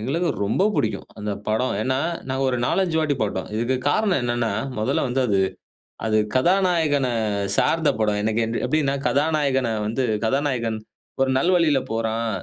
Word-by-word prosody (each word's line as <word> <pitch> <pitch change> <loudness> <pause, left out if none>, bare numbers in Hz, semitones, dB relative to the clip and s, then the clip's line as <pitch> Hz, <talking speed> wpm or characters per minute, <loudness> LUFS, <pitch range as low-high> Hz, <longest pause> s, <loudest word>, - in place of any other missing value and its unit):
எங்களுக்கு 160 +10 -1 0.2
ரொம்ப 110 - +1
பிடிக்கும் - - -1
அந்த 105 0 -3 0.2
படம். 110 +3 0
ஏன்னா, 130 +2 0 0.3
நாங்க 135 +1 -1
ஒரு 125 - 0
4,5 180 -1 +1
வாட்டி 150 -2 +1
போட்டோம். 100 -3 -2
இதுக்கு 120 +4 0
காரணம் 200 -8 +2
என்னன்னா, 120 -1 0 0.3
மொதல்ல 110 - 0
வந்து 130 +2 0
அது 100 -3 +2 0.7
அது 110 -1 +2 0.2
கதாநாயகன 165 -4 +2 0.5
சார்ந்த 160 -2 +2
படம். 105 -1 +1
எனக்கு 110 +1 +1 0.2
எப்படின்னா, 145 -3 +1
கதாநாயகன 140 -4 +1 0.2
வந்து 125 +4 -1 0.2
கதாநாயகன் 120 -3 0 0.4
ஒரு 135 - +3
நல்வழியில 170 -3 +3
போறான். 115 0 -1
130 Hz, 140 wpm, -23 LUFS, 115-155 Hz, 0.7 s, ஒரு